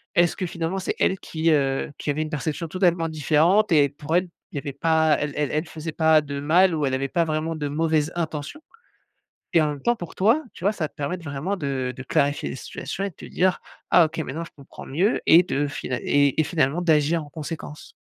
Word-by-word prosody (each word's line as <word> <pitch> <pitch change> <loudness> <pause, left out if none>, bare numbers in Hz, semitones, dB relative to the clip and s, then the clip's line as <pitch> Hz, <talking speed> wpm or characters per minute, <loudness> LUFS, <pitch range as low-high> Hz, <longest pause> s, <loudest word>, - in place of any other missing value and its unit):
est-ce 175 -1 +3
que 185 - -2
finalement, 170 +2 -3
c'est 185 - -3
elle 190 - +1
qui 160 0 0
heu, 135 -2 +1
qui - - -5
avait 145 +2 0
une 155 - -3
perception 155 +2 -3
totalement 175 -2 +1
différente? 160 +7 +3
Et 145 -2 +5
pour 145 +3 -4
elle, 180 0 +2 0.2
il - - -9
y - - -1
avait 140 - -5
pas 160 +1 +2
elle 150 -1 -2
elle 150 -2 -1
elle 155 +3 -1
faisait 160 +1 -6
pas 160 0 +4
de 140 -1 -5
mal 170 +5 +4
ou 155 -2 0
elle 135 - -1
avait 135 +1 -1
pas 170 -2 +1
vraiment 160 +1 -2
de 145 -1 -2
mauvaises 155 +1 0
intentions?» 160 - -4 0.9
et 165 - +4
en 150 - +1
même 145 -2 -5
temps 240 - +2
pour 175 -7 -8
toi, 225 +11 +3
tu - - -12
vois, 200 - +3
ça 170 -8 -3
te - - -32
permet 150 +4 -3
de 175 - -13
vraiment 150 +6 -3
de 135 -5 -2
de 130 - -6
clarifier 140 +2 0
les - - -5
situations 180 +8 -6
et 200 - -1
de 175 - -19
te - - -11
dire: 185 0 +1 0.3
«Ah 175 - +6
OK, 155 - -5
maintenant, 160 +1 -4
je - - -15
comprends 140 -2 -12
mieux» 180 - +1
et 165 - +8
de 145 -5 -1
final 130 -2 -4
et 145 0 +2
et - - +5
finalement 155 0 0
d'agir 160 0 +2
en - - -14
conséquence. 150 -1 -7
155 Hz, 240 wpm, -24 LUFS, 145-170 Hz, 0.9 s, et